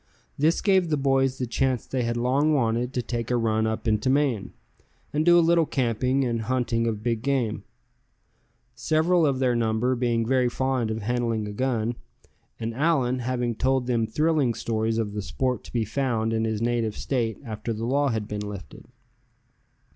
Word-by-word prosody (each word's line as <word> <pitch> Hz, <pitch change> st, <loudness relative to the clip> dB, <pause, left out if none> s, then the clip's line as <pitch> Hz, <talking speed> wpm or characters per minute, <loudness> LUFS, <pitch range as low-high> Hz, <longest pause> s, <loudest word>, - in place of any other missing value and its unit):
This 155 Hz, +4 st, +2 dB
gave 190 Hz, -4 st, +3 dB
the 150 Hz, -, +1 dB
boys 135 Hz, -1 st, +1 dB
the 125 Hz, -, -2 dB
chance 130 Hz, 0 st, 0 dB
they 130 Hz, -, -2 dB
had 120 Hz, 0 st, -1 dB
long 140 Hz, +6 st, +2 dB
wanted 120 Hz, -1 st, 0 dB
to 125 Hz, -, 0 dB
take 115 Hz, -2 st, -3 dB
a 125 Hz, -, +2 dB
run 110 Hz, -1 st, +1 dB
up 110 Hz, +2 st, -3 dB
into 110 Hz, +4 st, +1 dB
Maine, 135 Hz, -7 st, +1 dB, 0.6 s
and 150 Hz, +1 st, +1 dB
do 175 Hz, +1 st, +6 dB
a 170 Hz, -, +5 dB
little 170 Hz, -2 st, +4 dB
camping, 130 Hz, +1 st, 0 dB
and 115 Hz, -2 st, -1 dB
hunting 115 Hz, -1 st, 0 dB
of 110 Hz, -2 st, -3 dB
big 115 Hz, -2 st, 0 dB
game; 120 Hz, -6 st, -1 dB, 1.1 s
several 160 Hz, +6 st, +2 dB
of 135 Hz, -2 st, +1 dB
their 130 Hz, -2 st, +1 dB
number 115 Hz, +2 st, +1 dB
being 120 Hz, -2 st, 0 dB
very 125 Hz, 0 st, +2 dB
fond 130 Hz, -2 st, -1 dB
of 110 Hz, -1 st, -3 dB
handling 115 Hz, -2 st, -1 dB
a -, -, -5 dB
gun; 120 Hz, -1 st, -1 dB, 0.7 s
and 115 Hz, 0 st, -3 dB
Allan 130 Hz, -3 st, +1 dB
having 120 Hz, -1 st, -1 dB
told 130 Hz, +2 st, +1 dB
them 115 Hz, -3 st, 0 dB
thrilling 150 Hz, -1 st, +1 dB
stories 110 Hz, 0 st, -1 dB
of 105 Hz, -3 st, -2 dB
the 105 Hz, -, -3 dB
sport 125 Hz, +5 st, -2 dB
to -, -, -11 dB
be 115 Hz, -2 st, 0 dB
found 115 Hz, -1 st, -1 dB
in 110 Hz, 0 st, 0 dB
his 110 Hz, 0 st, -2 dB
native 115 Hz, -2 st, 0 dB
State 120 Hz, -5 st, -1 dB
after 110 Hz, 0 st, -4 dB
the 115 Hz, +1 st, -3 dB
law 140 Hz, +4 st, +2 dB
had 110 Hz, -3 st, -2 dB
been 105 Hz, -1 st, -4 dB
lifted. 100 Hz, -3 st, -8 dB
120 Hz, 185 wpm, -25 LUFS, 115-135 Hz, 1.1 s, do